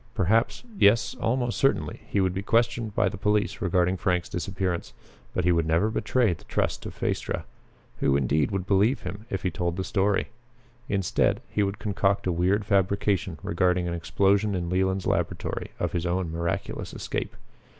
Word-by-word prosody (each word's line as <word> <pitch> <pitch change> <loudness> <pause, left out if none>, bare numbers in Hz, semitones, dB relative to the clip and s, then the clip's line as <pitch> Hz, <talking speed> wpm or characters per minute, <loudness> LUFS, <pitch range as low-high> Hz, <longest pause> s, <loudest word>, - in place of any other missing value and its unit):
Perhaps 110 - +2 0.2
yes, 105 +3 +4
almost 120 0 0
certainly, 135 - +1
he 100 - 0
would 95 -1 +2
be 95 - -2
questioned 115 0 +1
by 105 - +3
the 95 0 -4
police 105 +3 +1
regarding 90 -1 +2
Frank's 90 -1 0
disappearance. 90 -1 -3 0.4
But 90 - -1
he 90 - +4
would 85 -2 +2
never 85 +7 +2
betray 120 -3 +2
the 80 - -11
trust - - -1
of - - -9
Phaestra. - - -2 0.6
Who 70 - +3
indeed 70 +3 +1
would 95 -2 -2
believe 105 +6 +3
him 105 +3 -7
if 95 - -3
he 90 - 0
told 85 +1 -2
the 95 - -1
story? 100 +1 +1 0.6
Instead, 95 -3 +1
he 105 - 0
would 100 0 0
concoct 100 -2 0
a 95 - +1
weird 95 +4 +1
fabrication 95 -3 +1
regarding 90 0 +1
an 85 - -2
explosion 95 +4 +2
in 85 -1 -2
Leland's 95 +1 +1
laboratory, - - -1
of - - -1
his 85 0 -1
own 90 -1 -1
miraculous 85 +1 -3
escape. - - -4
95 Hz, 170 wpm, -26 LUFS, 90-105 Hz, 0.6 s, yes